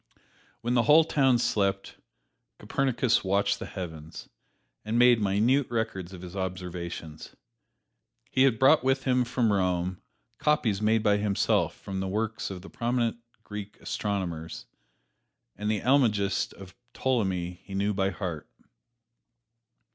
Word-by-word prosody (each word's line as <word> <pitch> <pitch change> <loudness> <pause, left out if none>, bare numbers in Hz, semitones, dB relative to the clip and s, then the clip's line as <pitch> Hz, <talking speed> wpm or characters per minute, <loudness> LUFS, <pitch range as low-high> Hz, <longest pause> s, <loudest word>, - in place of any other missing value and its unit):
When 120 +1 -1
the 120 - +4
whole 155 +2 +8
town 135 -5 +3
slept, 100 -4 -1 0.6
Copernicus 125 -3 +1
watched 100 +1 +1
the - - -6
heavens, 80 -4 -8 0.5
and 110 +2 -1
made 120 -2 +6
minute 110 +8 +2
records 110 -6 -3
of 90 -2 -10
his 90 +1 -9
observations. 90 -4 -6 1.0
He 130 - +2
had 130 -4 +4
brought 135 +4 +5
with 135 0 +1
him 125 -1 +2
from 120 -3 +1
Rome 90 -1 0 0.4
copies 115 -9 +1
made 110 0 +2
by 105 -1 +3
himself 105 -1 +1
from 95 -1 -6
the 95 - -2
works 110 +3 -2
of 95 -2 -7
the - - -10
prominent 120 -1 -1 0.3
Greek 105 -1 -8
astronomers, 90 -6 -4 0.9
and 105 +1 -3
the 110 -2 0
"Almagest" 110 -7 +2
of 95 -2 -12 0.2
Ptolemy 95 -9 -1
he 95 - -8
knew 100 +2 +1
by 95 0 +1
heart. 85 -3 -5
105 Hz, 130 wpm, -28 LUFS, 95-120 Hz, 1.0 s, whole